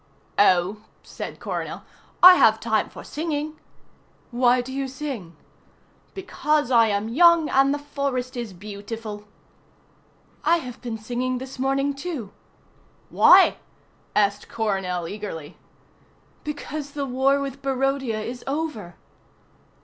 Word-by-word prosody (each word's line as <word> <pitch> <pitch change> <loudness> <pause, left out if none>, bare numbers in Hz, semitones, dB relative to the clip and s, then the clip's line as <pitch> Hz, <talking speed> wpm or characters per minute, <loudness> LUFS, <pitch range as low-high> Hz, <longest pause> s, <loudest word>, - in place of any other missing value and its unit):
"Oh," 185 0 +4 0.3
said - - -8
Coronel, - - -5 0.4
"I 365 0 +12
have - - +5
time - - 0
for - - -11
singing." 305 -1 -4 0.7
"Why 245 +1 +3
do 255 +2 -5
you 275 0 -2
sing?" 260 - -6 0.8
"Because 305 -7 -1
I 230 -2 +6
am 205 0 -1
young 335 +5 +5
and 270 +1 +4
the 290 - 0
forest 280 -3 -3
is 240 -4 -5
beautiful." 205 +2 -8 1.2
"I 335 +3 +4
have 255 -6 -8
been 235 -3 -4
singing 250 +3 -2
this 260 +1 -8
morning, 275 +2 +1
too." 275 - -6 0.8
"Why?" - - +7 0.6
asked 205 0 +1
Coronel 190 -6 -2
eagerly. 175 -6 -7 0.9
"Because 295 -1 -6
the 285 -1 -3
war 270 +2 +2
with 275 -1 -5
Barodia 270 -4 -1
is 245 +3 -6
over." 275 - -4
255 Hz, 120 wpm, -24 LUFS, 215-280 Hz, 1.2 s, I